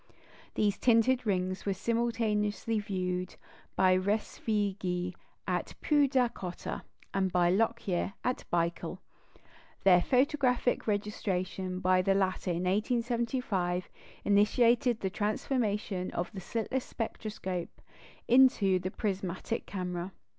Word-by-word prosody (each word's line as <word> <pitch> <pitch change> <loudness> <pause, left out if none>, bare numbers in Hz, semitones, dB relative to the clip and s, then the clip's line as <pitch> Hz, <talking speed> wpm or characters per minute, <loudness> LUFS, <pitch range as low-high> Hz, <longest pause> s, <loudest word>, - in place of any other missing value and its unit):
These 205 -1 +1
tinted 245 +1 +3
rings 185 -1 0
were 200 -1 -1
simultaneously 225 -2 0
viewed 185 -3 -3 0.4
by 185 -1 +5
Respighi 195 -2 -1 0.3
at - - -2
Poodacottah, 255 - +1 0.3
and 190 -1 +1
by 175 -1 +3
Lockyer 200 -2 0
at 250 0 -1
Baikul. 170 +1 -1 0.9
Their 180 -2 +6
photographic 255 - +2
registration 190 -3 -2
by 185 0 +3
the 195 +1 +2
latter 190 -1 0
in 175 0 -1
1875 220 -3 0 0.4
initiated 230 +3 +3
the 190 - -1
transformation 210 -3 -1
of 175 - -2
the 190 - -6
slitless 230 +7 -2
spectroscope 205 -6 -5 0.5
into 235 -7 +5
the 185 +1 -3
prismatic 195 +2 -3
camera. 180 -1 -4
200 Hz, 100 wpm, -30 LUFS, 185-230 Hz, 0.9 s, Their